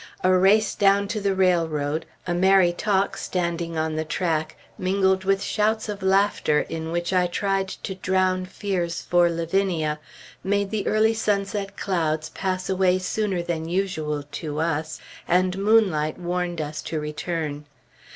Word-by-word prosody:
A 185 0 +4
race 200 +4 +4
down 200 0 +3
to 215 -1 -2
the 195 -1 +1
railroad, 160 -5 +1 0.2
a 175 - -1
merry 185 0 +4
talk 195 +1 0
standing 170 -2 -2
on 155 0 -1
the 155 - 0
track 160 0 -1 0.2
mingled 190 -1 +1
with 195 0 +2
shouts 220 +1 0
of 205 -1 -5
laughter 190 -5 +2
in 160 0 -5
which 175 +2 -1
I 180 -1 +3
tried 195 +1 -1
to 190 - -6
drown 185 0 0
fears 180 -4 -3
for 175 -1 +3
Lavinia, 165 -2 0 0.4
made 200 0 0
the 215 -2 -2
early 220 +1 +3
sunset 200 -2 -1
clouds 160 -4 -1
pass 185 -1 -3
away 185 -1 +2
sooner 185 -1 -1
than 165 -1 -3
usual, 160 -6 -1 0.2
to 150 -2 -4
us, 160 -1 -2 0.3
and 180 +1 +2
moonlight 195 -8 +3
warned 175 -1 -2
us 150 0 -4
to 160 - -3
return. 150 -1 -4
185 Hz, 150 wpm, -24 LUFS, 165-195 Hz, 0.4 s, A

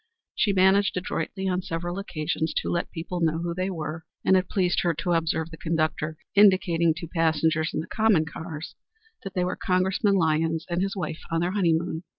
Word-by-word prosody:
She 210 - +2
managed 190 +1 +3
adroitly 185 +2 -3
on 180 0 0
several 175 +2 -4
occasions 160 -3 -2
to - - -1
let 170 - -1
people 175 +2 -5
know 160 -1 +2
who 170 +1 -2
they 185 +2 -2
were, 160 -2 -5 0.2
and 190 - +5
it 185 0 +1
pleased 180 -2 +1
her 170 -3 +1
to 165 +3 -2
observe 165 -1 0
the 165 - -9
conductor 155 -1 -1 0.2
indicating 175 -5 +4
to 170 0 -6
passengers 160 -1 +1
in - - -2
the - - -7
common 215 -8 +3
cars 160 +1 -7 0.5
that 195 -2 -7
they 180 - +1
were 180 0 -1
Congressman 190 +2 +1
Lyons 160 -2 +1
and 175 +1 0
his 195 +1 -1
wife 175 -4 -4
on 165 -1 0
their 175 +1 0
honeymoon. 170 -4 +1
170 Hz, 190 wpm, -26 LUFS, 160-185 Hz, 0.5 s, and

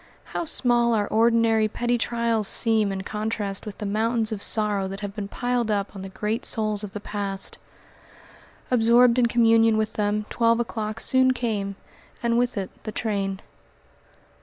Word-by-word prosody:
How - - -2
small 240 -6 +2
our 205 -2 0
ordinary, 225 -1 +3
petty 240 +2 -1
trials 230 -3 0
seem 220 -3 +2
in 190 0 -4
contrast 210 -1 -3
with 205 - -7
the 210 - -5
mountains 220 +2 0
of 210 -2 -4
sorrow 210 -3 +1
that 195 +2 -7
have 200 -1 -5
been 205 -2 -4
piled 245 +1 -1
up 205 -1 -1
on 195 - -7
the 195 - -7
great 210 +4 -3
souls 215 -1 +1
of 200 -2 -7
the 205 - -5
past! 200 -1 -4 1.1
Absorbed 240 +1 +5
in 240 - +4
communion 225 -1 +4
with 215 -1 -1
them 210 0 -1
twelve 230 0 +2
o'clock 220 -2 -3
soon 260 +1 +3
came, 210 -5 -2 0.5
and 235 0 +2
with 245 -2 0
it 190 -2 -3
the 215 - -5
train. 200 -4 -2
220 Hz, 165 wpm, -24 LUFS, 205-235 Hz, 1.1 s, Absorbed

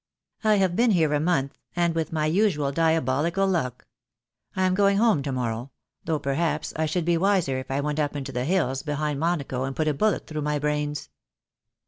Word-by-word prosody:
"I 215 -1 +4
have 190 -3 +2
been 240 +3 +3
here 160 -7 +3
a 145 - +2
month, 150 -4 0 0.2
and 170 -1 +2
with 165 -1 -2
my 155 -2 0
usual 155 -4 +2
dia 165 +2 +2
bolical 165 +9 +1
luck. 130 -10 -1 0.7
I 190 - +1
am 185 0 +3
going 200 +1 +3
home 220 -9 +3
to 140 - -3
morrow 120 0 -3 0.2
— - - -49
though 160 -2 0
per 140 -1 -2
haps 160 0 -1
I 160 0 0
should 165 +2 -1
be 170 0 +2
wiser 185 -9 +2
if 130 - -9
I 135 +1 0
went 150 +1 -2
up 145 -1 -1
into 135 -1 -4
the 125 +1 -2
hills 145 -6 0
behind 150 -1 -2
Monaco 145 -6 -1
and 135 0 -3
put 155 - 0
a 150 - +2
bullet 210 +8 0
through 155 -1 -4
my 150 0 0
brains. 150 0 -2
155 Hz, 215 wpm, -25 LUFS, 140-175 Hz, 0.7 s, I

